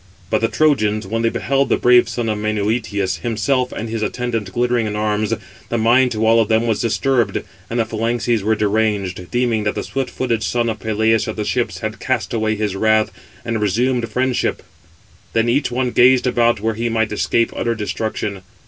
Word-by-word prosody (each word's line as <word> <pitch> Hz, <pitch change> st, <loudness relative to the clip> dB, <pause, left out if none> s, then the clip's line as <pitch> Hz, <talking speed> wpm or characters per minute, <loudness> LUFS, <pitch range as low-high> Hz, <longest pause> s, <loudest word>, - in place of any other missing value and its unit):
But 110 Hz, -, +2 dB
the 115 Hz, -, +3 dB
Trojans, 110 Hz, -8 st, +1 dB
when 115 Hz, +4 st, -2 dB
they 115 Hz, -, +2 dB
beheld 135 Hz, +4 st, 0 dB
the -, -, +3 dB
brave 120 Hz, -1 st, +5 dB
son 115 Hz, 0 st, -2 dB
of 105 Hz, -1 st, -1 dB
Menœtius, 105 Hz, -2 st, -1 dB
himself 125 Hz, +3 st, 0 dB
and 115 Hz, -, -5 dB
his 115 Hz, 0 st, -4 dB
attendant 115 Hz, -2 st, -2 dB
glittering 120 Hz, +1 st, +1 dB
in 105 Hz, -, -3 dB
arms, 105 Hz, 0 st, 0 dB, 0.4 s
the 120 Hz, -, 0 dB
mind 120 Hz, +3 st, +4 dB
to 110 Hz, 0 st, 0 dB
all 115 Hz, +1 st, +5 dB
of 110 Hz, -, 0 dB
them 110 Hz, +1 st, +2 dB
was 110 Hz, -3 st, 0 dB
disturbed, 120 Hz, +1 st, +1 dB, 0.3 s
and 120 Hz, -, -2 dB
the 115 Hz, -, +2 dB
phalanxes 115 Hz, +1 st, -1 dB
were 110 Hz, +3 st, +1 dB
deranged, 105 Hz, -4 st, -1 dB
deeming 120 Hz, -3 st, 0 dB
that 105 Hz, -, -1 dB
the -, -, -3 dB
swift 135 Hz, -1 st, -3 dB
footed 120 Hz, -4 st, -1 dB
son 120 Hz, 0 st, 0 dB
of 110 Hz, -, -4 dB
Peleus 110 Hz, 0 st, +1 dB
at -, -, -3 dB
the 105 Hz, -, -3 dB
ships 120 Hz, +2 st, -1 dB
had 110 Hz, -1 st, -4 dB
cast 130 Hz, -1 st, -2 dB
away 110 Hz, -1 st, 0 dB
his 105 Hz, -2 st, -2 dB
wrath, 110 Hz, +1 st, +2 dB, 0.3 s
and 115 Hz, -2 st, -2 dB
resumed 120 Hz, +4 st, +1 dB
friendship: 125 Hz, +2 st, -1 dB, 0.7 s
then 115 Hz, +1 st, +2 dB
each 130 Hz, +5 st, +1 dB
one 125 Hz, 0 st, -1 dB
gazed 125 Hz, +1 st, +5 dB
about 120 Hz, -2 st, +2 dB
where 110 Hz, +1 st, 0 dB
he 115 Hz, +2 st, -2 dB
might 110 Hz, -1 st, 0 dB
escape 115 Hz, +2 st, +1 dB
utter 115 Hz, -1 st, -1 dB
destruction. 105 Hz, -2 st, -3 dB
115 Hz, 195 wpm, -19 LUFS, 110-120 Hz, 0.7 s, brave